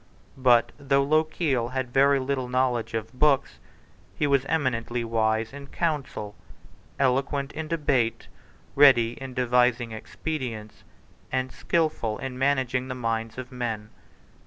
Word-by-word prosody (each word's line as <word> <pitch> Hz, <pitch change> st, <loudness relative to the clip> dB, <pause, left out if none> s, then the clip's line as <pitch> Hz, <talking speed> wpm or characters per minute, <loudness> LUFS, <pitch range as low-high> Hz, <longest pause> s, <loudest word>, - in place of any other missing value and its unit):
But 125 Hz, -2 st, +4 dB
though 140 Hz, -1 st, +2 dB
Lochiel 150 Hz, -4 st, +1 dB
had 130 Hz, -2 st, -3 dB
very 140 Hz, +1 st, +5 dB
little 130 Hz, -1 st, -2 dB
knowledge 125 Hz, -3 st, 0 dB
of 110 Hz, +2 st, -4 dB
books, 140 Hz, +1 st, +2 dB, 0.6 s
he 150 Hz, -, 0 dB
was 140 Hz, -2 st, +2 dB
eminently 125 Hz, -6 st, -1 dB
wise 110 Hz, 0 st, 0 dB
in 140 Hz, 0 st, -9 dB
council, 140 Hz, -, -3 dB, 0.6 s
eloquent 135 Hz, +1 st, 0 dB
in 160 Hz, 0 st, -5 dB
debate, 140 Hz, -8 st, 0 dB, 0.5 s
ready 130 Hz, -5 st, +6 dB
in 130 Hz, -2 st, -7 dB
devising 125 Hz, -1 st, +2 dB
expedients, 110 Hz, -3 st, -6 dB, 0.5 s
and 130 Hz, 0 st, -1 dB
skilful 155 Hz, -10 st, -1 dB
in 130 Hz, -1 st, -5 dB
managing 130 Hz, -2 st, +1 dB
the 130 Hz, -, -4 dB
minds 115 Hz, -2 st, -2 dB
of 130 Hz, 0 st, -7 dB
men. 115 Hz, -4 st, -4 dB
130 Hz, 125 wpm, -26 LUFS, 115-140 Hz, 0.6 s, ready